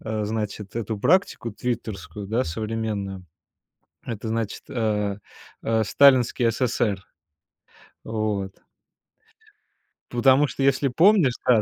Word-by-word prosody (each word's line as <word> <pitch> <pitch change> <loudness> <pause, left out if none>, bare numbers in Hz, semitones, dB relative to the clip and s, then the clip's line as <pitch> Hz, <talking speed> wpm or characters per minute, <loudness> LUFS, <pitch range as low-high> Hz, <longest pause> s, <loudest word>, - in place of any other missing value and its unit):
э, 110 -1 -3
значит, 105 -1 -4
эту 110 -2 -3
практику 185 - +2
твиттерскую, 105 -4 -5
да, 115 +5 0
современную. 105 -1 -4 0.8
Это, 110 -1 -5
значит, 110 -2 -3
э, 105 -4 -1 0.4
э, 110 -1 +1
сталинский 125 -2 +4
СССР. 110 -5 0 1.0
Вот. 105 -3 -3 1.5
Потому 130 +4 +4
что, 135 - -4
если 135 +1 +3
помнишь, 165 - +4
та 115 -4 +5
110 Hz, 100 wpm, -24 LUFS, 105-125 Hz, 1.5 s, та